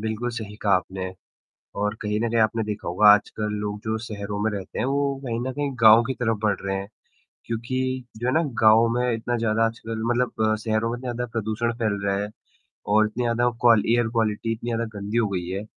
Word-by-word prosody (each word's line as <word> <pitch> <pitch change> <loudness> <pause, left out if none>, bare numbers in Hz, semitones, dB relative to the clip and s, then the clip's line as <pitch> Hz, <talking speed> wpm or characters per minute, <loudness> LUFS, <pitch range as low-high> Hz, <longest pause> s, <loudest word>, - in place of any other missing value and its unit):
बिल्कुल 110 +3 -2
सही 110 -3 -6
कहा 100 -2 +2
आपने 95 0 -3 0.7
और 105 +1 0
कहीं 105 0 -1
न 115 +1 0
कहीं 115 0 +1
आपने 110 +1 +1
देखा 105 -1 -5
होगा 90 +5 +4
आजकल 105 +1 +3
लोग 105 0 -3
जो 110 0 -1
शहरों 100 -2 -5
में 110 - +2
रहते 100 -2 -6
हैं, - - +1
वो 140 +1 0
कहीं 115 -2 -2
न 130 +2 -2
कहीं 145 0 -2
गाँव 110 +1 +8
की 130 +3 -2
तरफ़ 115 -3 -1
बढ़ 105 -2 +3
रहे 95 0 -2
हैं। 100 0 -5 0.6
क्योंकि 130 +3 -2
जो 120 +3 -3
है 125 - +2
ना 160 - +3 0.2
गाँव 110 +1 +6
में 125 0 +1
इतना 115 +2 -2
ज़्यादा 115 0 +2
आजकल 115 0 -4
मतलब 120 -3 +1
शहरों 110 +1 0
में 120 - -4
ज़्यादा 125 -1 -3
प्रदूषण 115 0 -2
फ़ैल 110 -4 -1
रहा 100 0 +1
है 100 +1 -3 0.6
और 110 +1 +4
इतनी 110 +3 -3
ज़्यादा 120 +1 +2
क्वाल 115 -3 +6
एयर 120 0 +3
क्वालिटी 115 0 0
इतनी 115 +1 -4
ज़्यादा 115 0 -1
गंदी 105 +3 -3
हो 115 -3 +3
गई 90 -3 -3
है, 95 +2 -3
110 Hz, 215 wpm, -24 LUFS, 105-120 Hz, 0.7 s, गाँव